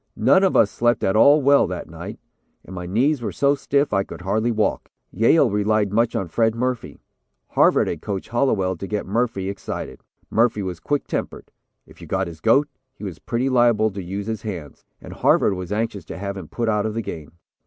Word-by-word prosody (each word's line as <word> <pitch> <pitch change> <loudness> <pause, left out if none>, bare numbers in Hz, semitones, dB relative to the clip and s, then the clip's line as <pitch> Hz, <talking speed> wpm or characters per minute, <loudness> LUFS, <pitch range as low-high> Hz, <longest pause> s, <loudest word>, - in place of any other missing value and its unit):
None 190 - +4
of 190 - +2
us 100 - +4
slept 120 -1 +1
at 95 - +1
all 140 +6 +6
well 140 +1 +5
that - - -5
night, - - -8 0.5
and 95 - -10
my 90 -1 -6
knees 125 +9 +1
were 115 - -3
so 140 0 +2
stiff 140 -2 0
I 95 -1 +2
could - - -10
hardly 110 +6 0
walk. 110 -2 -1 0.2
Yale 120 +2 +3
relied 105 0 +1
much 115 +1 +2
on 95 - -1
Fred 110 +6 +1
Murphy. 125 0 -3 0.5
Harvard - - +3
had - - -4
coached 100 -2 -5
Hallowell 110 -7 +1
to 100 - -6
get 105 0 -3
Murphy 110 -2 -1
excited. 100 0 -6 0.3
Murphy 110 -2 +2
was 90 -3 -5
quick 145 - -1
tempered. - - -5 0.3
If - - -18
you - - -10
got 95 0 0
his 80 -2 -10
goat, 135 - +4 0.3
he - - -13
was 90 -6 -6
pretty 120 +3 -2
liable 120 -4 +3
to 100 0 -6
use 95 +3 -5
his 110 -2 -4
hands, 85 -10 -7 0.2
and - - -10
Harvard - - +3
was 90 0 -6
anxious 105 -3 -2
to - - -8
have 100 +1 -4
him 95 -5 -8
put 115 +6 -3
out 105 -1 +1
of 110 - -5
the 115 - -2
game. 80 -6 -8
110 Hz, 210 wpm, -22 LUFS, 95-120 Hz, 0.5 s, all